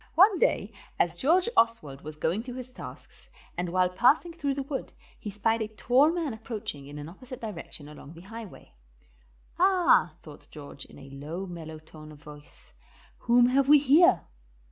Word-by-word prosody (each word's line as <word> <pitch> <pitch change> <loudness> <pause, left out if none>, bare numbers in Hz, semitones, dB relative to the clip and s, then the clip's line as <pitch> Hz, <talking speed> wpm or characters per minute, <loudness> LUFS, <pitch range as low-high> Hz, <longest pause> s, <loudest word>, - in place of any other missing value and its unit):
One 380 +1 +6
day 210 +3 +1 0.2
as 170 0 0
George 350 - +3
Oswald 155 -13 +1
was 155 0 -9
going 165 +7 -1
to 250 -1 -7
his 255 0 -8
tasks, - - -12 0.3
and 175 0 -3
while 185 +1 +2
passing 275 - +2
through 285 -5 -2
the 275 - -3
wood, 275 0 -6 0.3
he 215 - -6
spied 225 +3 0
a 220 - -1
tall 250 +7 +3
man 330 -7 -2
approaching 215 - -7
in 145 +1 -9
an 145 0 -7
opposite 250 +9 -11
direction 170 -8 -8
along 150 0 -12
the 165 - -13
highway. 220 +2 -11 0.9
"Ah," 355 - +4
thought 150 -2 -13
George, 145 -2 -11
in - - -16
a 135 -1 -13
low, 155 +7 -6
mellow 165 -3 -8
tone 155 0 -14
of 150 - -13
voice, 150 0 -15 0.5
"whom 240 +1 +4
have 270 +1 +2
we 300 - +9
here?" 290 - +5
215 Hz, 175 wpm, -27 LUFS, -, 0.9 s, we